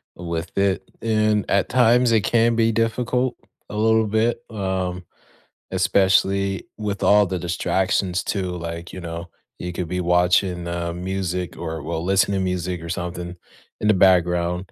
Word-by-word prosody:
with 85 -1 -5
it. 100 -1 +1 0.2
And 110 -2 +1
at 100 -1 +2
times, 120 -1 +4
it 110 - +4
can 115 +3 +2
be 115 0 +3
difficult 120 +3 0 0.3
a - - -7
little 110 +1 +3
bit, 110 +3 0
um, 95 -3 -3 0.7
especially 95 +1 +2
with 105 -2 -3
all 105 0 +5
the 95 -1 -3
distractions 90 +1 0
too. 95 -3 -2
Like, 85 0 -6
you 95 - -7
know, 85 0 -6 0.3
you 90 0 -5
could 85 -1 -3
be 90 +1 -3
watching, 90 0 +2
um, 85 0 -4
music 90 -2 -3
or, 80 -2 -5
well, 80 +1 -3
listen 95 +2 +2
to 95 - 0
music 90 -2 -2
or 85 - -7
something 90 0 -4 0.5
in 105 - +1
the 105 - +6
background. 90 -1 +2
95 Hz, 155 wpm, -22 LUFS, 90-105 Hz, 0.7 s, the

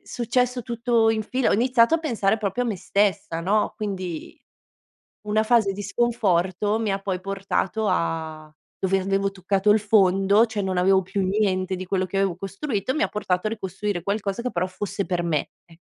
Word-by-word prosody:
successo 250 +1 -1
tutto 235 -1 +1
in 220 -1 +1
fila, 255 +3 0
ho - - +3
iniziato 245 +4 +4
a - - +2
pensare 225 -9 0
proprio 215 +3 -2
a - - -2
me 215 - -2
stessa, 185 -3 0
no, 210 +5 +1
quindi 185 -6 -5 0.9
una 215 +1 +2
fase 220 -4 +3
di 205 +1 -6
sconforto, 205 -2 +1
mi 215 -3 -1
ha 195 - -1
poi 190 -2 -3
portato 195 +2 -2
a 160 -3 -2 0.3
dove 190 0 +1
avevo 195 +1 0
toccato 195 +1 0
il 215 - +6
fondo, 200 0 +4
cioè 220 -2 -4
non 190 -1 -2
avevo 190 +1 +4
più 195 +2 -2
niente 190 -1 0
di 185 0 -6
quello 185 0 0
che 195 - -3
avevo 195 -3 +1
costruito, 200 +4 -3
mi 310 - 0
ha - - -1
portato 185 -2 -1
a - - 0
ricostruire 195 -3 -3
qualcosa 200 +2 -2
che 250 - -2
però 180 -2 -1
fosse 195 +1 -4
per 175 -2 -1
me, 160 -4 -1 0.2
eh, 165 -1 -19
195 Hz, 190 wpm, -24 LUFS, 185-220 Hz, 0.9 s, il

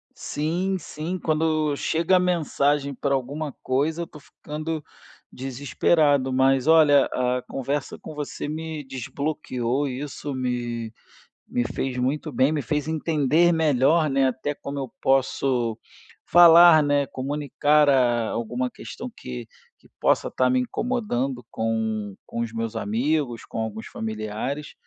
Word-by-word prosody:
Sim, 175 +6 -2
sim, 165 +3 -5
quando 155 -2 +1
chega 170 +5 +2
mensagem 145 -5 +1
para 140 +1 -1
alguma 145 +2 -3
coisa, 150 +6 0
eu - - -2
estou 150 - -14
ficando 155 +1 -6 0.5
desesperado. 135 +1 +1
Mas 130 0 +3
olha, 150 -4 +6
a 125 0 -1
conversa 135 +1 -3
com - - -9
você 145 0 -5
me 155 0 -5
desbloqueou 135 0 -3
e 130 +1 -4
isso 145 0 -5
me 120 -3 -3 0.6
me 120 - 0
fez 130 +2 -3
muito 140 +5 -1
bem, 130 +3 +2
me 150 -3 -1
fez 150 +5 -2
entender 160 +1 +2
melhor, 155 0 +3
né, 135 0 +2
até 140 +3 -4
como 140 0 -6
eu 135 - -5
posso 130 -3 +1 0.5
falar, 170 -1 +8
né, 145 -1 +2
comunicar 145 +3 +1
a 120 -4 +3
alguma 120 +2 -2
questão - - -8
que 60 -1 -7 0.3
que - - -23
possa - - +2
estar 130 0 +1
me 130 0 +3
incomodando 135 - -2
com 110 -2 -2
com - - -6
os 115 -1 -3
meus 115 0 -4
amigos, 120 +4 -1
com - - -6
alguns 110 0 -4
familiares. 110 +7 -4
140 Hz, 135 wpm, -24 LUFS, 125-155 Hz, 0.6 s, falar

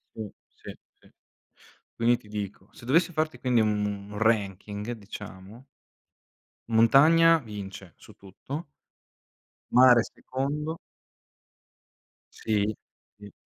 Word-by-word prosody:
Sì, 110 -2 -6 0.3
sì, - - -10 0.3
sì. - - -22 0.9
Quindi 120 +1 +3
ti 110 - -20
dico, 105 -1 -6
se - - -14
dovessi 165 +8 +3
farti, 155 0 -2
quindi, 125 -3 +2
un 105 -1 -2
ranking, 105 -1 -1
diciamo 105 +1 -11 1.0
montagna 155 +9 +6
vince 100 - -9
su - - -17
tutto. 135 - -8 1.0
Mare 125 -1 +7
secondo. 150 +7 -4 1.6
Sì? 105 -1 -1 0.4
I 105 -1 -12
110 Hz, 95 wpm, -27 LUFS, 105-130 Hz, 1.6 s, Mare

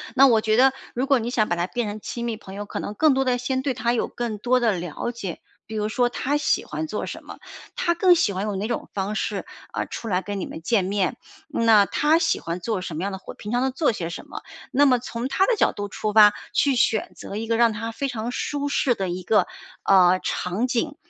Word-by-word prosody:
那 270 +1 +8
我 235 -4 +5
觉 215 0 +1
得 265 +3 +6 0.2
如 250 +2 -1
果 275 -2 +3
你 230 +1 -3
想 225 -4 +1
把 175 - 0
他 175 +1 0
变 240 +3 -2
成 210 +1 -6
亲 235 +3 -5
密 230 -2 -2
朋 190 - -11
友， 205 +1 -5
可 - - -5
能 205 - -4
更 305 +7 +4
多 270 0 +1
的 250 -1 +2
先 260 +1 -1
对 265 -1 -1
他 235 0 0
有 240 - 0
更 235 -3 -4
多 250 +4 +2
的 230 -2 +3
了 175 +4 -4
解， 200 -8 -6 0.2
比 220 - -8
如 210 0 -1
说 245 +3 +2
他 275 +4 -1
喜 295 - +1
欢 315 - -4
做 - - -3
什 - - -8
么， - - -10 0.4
他 340 - +1
更 355 +1 +5
喜 275 -11 +2
欢 190 +1 -3
用 205 -2 -2
哪 210 +4 -3
种 235 - -3
方 200 +1 -2
式， - - -2 0.3
啊， - - -1
出 230 - -7
来 185 -3 +1
跟 205 0 -4
你 - - -3
们 160 - -8
见 200 +2 +1
面， 200 +4 0 0.3
那 225 -7 +5
他 300 +9 +2
喜 325 - +1
欢 170 +2 -5
做 220 0 -1
什 180 -3 -6
么 165 - -3
样 200 - -2
的 190 - -5
活， 190 - -10
平 210 - -8
常 245 +1 +1
都 265 - +2
做 265 +3 +1
些 175 -6 -4
什 170 - -7
么， - - -9 0.3
那 285 +3 +4
么 255 -3 +5
从 235 0 -4
他 380 +8 +2
的 470 0 +1
角 - - +3
度 205 0 -5
出 210 0 -3
发， 210 -1 +8 0.2
去 275 -3 +2
选 225 -2 +1
择 - - -8
一 220 +2 -3
个 230 0 0
让 235 -1 +4
他 225 +1 -4
非 275 +5 -3
常 240 -2 -4
舒 285 +2 -2
适 270 -3 +2
的 190 -3 -2
一 180 +1 -4
个， 210 +4 +3 0.4
呃， 185 -1 +5
场 190 +7 -1
景， 255 +4 -1
225 Hz, 280 characters per minute, -24 LUFS, 200-255 Hz, 0.4 s, 那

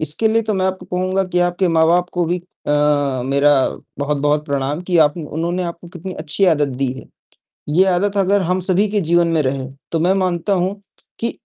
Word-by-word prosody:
इसके 155 +9 0
लिए 225 +1 +2
तो 215 -1 -1
मैं 190 -1 +1
आपको 185 -1 -4
कहूँगा 185 +2 -1
कि 180 -1 -2
आपके 175 +1 +1
माँ-बाप 165 +2 +3
को 175 -1 0
भी 175 +1 -2 0.3
अ, - - +2 0.6
मेरा 140 +2 +3 0.5
बहुत-बहुत 145 +1 0
प्रणाम 140 +2 -2
कि 175 - +2
आप 150 +2 0
उन्होंने 170 +3 -3
आपको 170 0 -7
कितनी 180 +2 -7
अच्छी 155 +5 -1
आदत 150 -4 +3
दी - - +2
है। 130 - -10 0.7
ये 170 +6 +4
आदत 195 +2 +1
अगर 195 +1 +3
हम 180 +1 0
सभी 190 +3 +3
के 205 0 0
जीवन 170 0 +2
में 160 - +3
रहे, 135 -1 -2 0.2
तो 165 - 0
मैं 180 +4 +3
मानता 180 +1 0
हूँ 190 +2 -1 0.4
कि 230 - -1
175 Hz, 200 wpm, -19 LUFS, 150-185 Hz, 0.7 s, ये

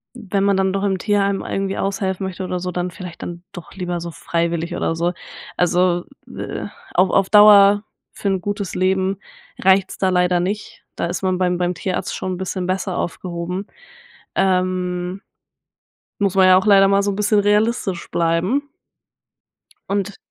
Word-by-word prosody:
Wenn 200 -4 -2
man 200 -1 +3
dann 190 0 +1
doch 195 - -1
im 195 -2 +1
Tierheim 200 -1 +1
irgendwie 195 0 -2
aushelfen 195 -1 -2
möchte 190 0 -6
oder 180 0 -3
so, 180 +1 -4
dann 180 0 -2
vielleicht 175 -1 -9
dann 175 0 -7
doch 175 -4 -10
lieber 180 -2 -4
so 170 0 -5
freiwillig 170 +1 -2
oder - - -1
so. 170 +2 0 0.4
Also, 175 0 +2 0.3
äh, - - -5 0.3
auf 185 +1 +4
auf 195 -1 +2
Dauer 205 0 +7 0.3
für - - -5
'n 190 -2 0
gutes 205 -1 -4
Leben 190 +1 +1 0.4
reicht's 190 0 +3
da 190 - +1
leider 180 -1 +2
nicht. 205 +4 -4
Da - - -1
ist 175 +1 -4
man 185 -1 +1
beim 180 -1 +1
beim 180 0 -1
Tierarzt 185 +2 -3
schon 185 - -3
'n - - -8
bisschen 185 -1 -3
besser 185 0 -2
aufgehoben. 180 +2 -4 0.7
Ähm, 185 0 0 1.0
muss 200 -2 +1
man 190 -1 +6
ja 185 0 +7
auch 190 - 0
leider 195 -2 +6
mal 200 0 +3
so 200 - 0
'n - - -4
bisschen 210 0 +2
realistisch 210 -3 0
bleiben. 175 - 0 1.2
Und 200 0 -2
185 Hz, 170 wpm, -20 LUFS, 180-200 Hz, 1.2 s, Dauer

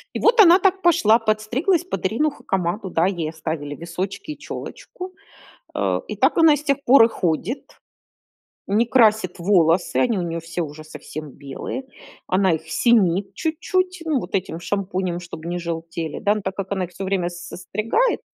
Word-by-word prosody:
И - - -1
вот 465 0 +3
она 360 -1 +8
так 385 0 +2
пошла, 320 - +4
подстриглась 230 - +1
под 370 - -4
Ирину 265 +11 +1
Хакамаду. 190 -3 -2
Да, 165 -1 +2
ей 175 -5 -1
оставили 155 -2 -5
височки 180 - -5
и 300 - -7
челочку, 370 0 -8 0.6
э, - - 0
и - - -5
так - - +3
она 325 -2 +7
и - - 0
с 295 - -8
тех 280 -2 +1
пор 250 -1 +7
и - - +3
ходит. 185 - -3 0.9
Не 210 +4 +3
красит 220 -6 +3
волосы, 175 -1 +2
они 235 -5 +2
у - - -1
неё 170 -1 -3
все 165 +1 -4
уже 155 0 -7
совсем 155 -1 -8
белые, 140 - -6 0.4
она 190 -1 +2
их 160 0 -6
синит 195 -1 +2
чуть-чуть, 365 +3 -1
ну 310 -4 +1
вот 180 -6 -7
этим 185 -4 -1
шампунем, 185 -1 -2
чтобы 170 -2 -9
не 175 +1 -2
желтели, 165 -2 -4
да. 205 0 +2
Но 215 - -3
так 190 0 -4
как 195 0 -4
она 190 -2 0
их 175 - -9
всё 185 +2 -7
время 190 -2 0
с 175 0 -9
состригает 215 - 0
195 Hz, 185 wpm, -22 LUFS, 170-250 Hz, 0.9 s, она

